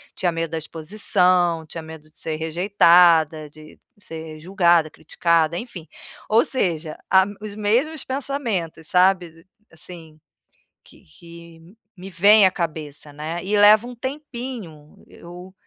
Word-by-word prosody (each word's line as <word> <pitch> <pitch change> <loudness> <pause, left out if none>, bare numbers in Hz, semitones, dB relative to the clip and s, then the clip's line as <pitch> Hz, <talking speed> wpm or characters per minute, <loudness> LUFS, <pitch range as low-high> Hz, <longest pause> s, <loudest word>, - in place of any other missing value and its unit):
tinha 175 -2 -1
medo 165 -1 -4
da 165 - -3
exposição, 175 0 +1
tinha 165 +1 -9
medo 160 -1 -12
de - - -28
ser 155 -1 -5
rejeitada, 165 -2 +3
de 155 +1 -16 0.2
ser 160 -5 -10
julgada, 170 -2 +2
criticada, 165 +1 -1
enfim. 180 -8 -8 0.4
Ou 225 +2 +3
seja, 165 - -3
a 190 0 +5 0.2
os 210 -1 -8
mesmos 245 +9 -1
pensamentos, 235 - -4
sabe, 180 -3 +1 0.3
assim, 160 -1 -14 0.6
que - - -21
que 170 - -16 0.2
me 190 +1 -11
vêm 200 +3 +5
à 185 - -1
cabeça 155 -4 -6
né. 160 +4 -6
E 205 +2 -1
leva 210 +2 +6
um 245 - -9
tempinho 240 - -8
eu 180 +2 -13
170 Hz, 130 wpm, -21 LUFS, 160-200 Hz, 0.6 s, leva